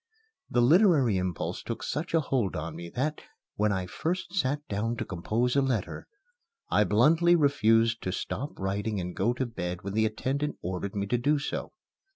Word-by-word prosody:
The 120 - +2
literary 150 - +5
impulse 90 -2 -3
took - - -5
such 165 +3 -2
a 165 - +4
hold 125 -9 -1
on 80 +1 -4
me 85 +1 -7
that, 150 +4 -1 0.3
when 105 0 +2
I 95 -2 -1
first 170 - -3
sat 145 -5 -1
down 110 +3 -1
to - - -4
compose 110 +8 -1
a 140 - +4
letter, 130 -7 -2 0.6
I 105 - +4
bluntly 160 - +4
refused 115 -7 +3
to 95 - -2
stop 140 +9 -4
writing 100 +2 -2
and 90 0 -5
go 105 +5 +2
to 130 +1 -2
bed 90 -5 -5
when 100 0 -4
the 110 +1 +3
attendant 140 +7 -2
ordered 95 +2 -4
me 100 -1 -1
to 120 +4 0
do 145 +5 +2
so. 140 - -4
115 Hz, 185 wpm, -28 LUFS, 100-140 Hz, 0.6 s, literary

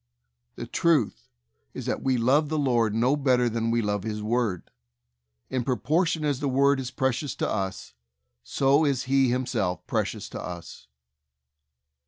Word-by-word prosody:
The - - -6
truth 160 -10 +1 0.5
is, - - -6
that - - -2
we 130 -1 +1
love 140 +6 +3
the 155 - -1
Lord 120 -7 +1
no 125 +5 +3
better 130 -4 +2
than 115 0 -1
we 115 0 +1
love 105 -1 -1
His 105 0 -4
Word. 110 -5 -1 0.8
In 130 -1 0
propor 140 - +1
tion 160 -2 -1
as 145 -3 0
the 140 -1 -1
Word 140 +1 +3
is 130 -2 -4
precious 130 0 -1
to - - -1
us, 95 -9 -3 0.5
so 140 - +2
is 140 -4 +1
He 135 0 +3
Himself 110 -8 -1
precious - - -2
to - - -6
us. 85 -5 -8
125 Hz, 160 wpm, -26 LUFS, 110-140 Hz, 0.8 s, love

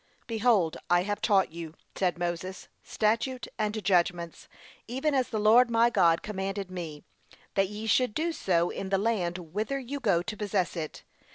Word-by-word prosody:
'Behold, 220 -7 +2
I 175 0 +4
have 205 +1 -3
taught 195 -6 +3
you,' 165 -1 -8 0.2
said 180 -3 0
Moses, 175 +2 -4
'statute 230 +4 -1
and 215 0 -1
judgments, 175 -2 0 0.4
even 265 +6 -1
as 260 -2 +1
the 220 - -2
Lord 225 +4 +6
my 230 +1 +4
God 170 -6 +3
commanded 195 -2 -4
me; 165 -5 -6 0.5
that 195 -1 +2
ye 210 +1 -6
should 235 0 +2
do 335 +2 0
so 175 - +1
in 190 - -5
the 195 - +2
land 190 -5 0 0.2
whither 220 +7 -1
you 275 +2 -5
go 195 -9 +2
to 215 +3 -5
possess 200 -4 -1
it. 155 -3 -5
200 Hz, 170 wpm, -28 LUFS, 175-230 Hz, 0.5 s, Lord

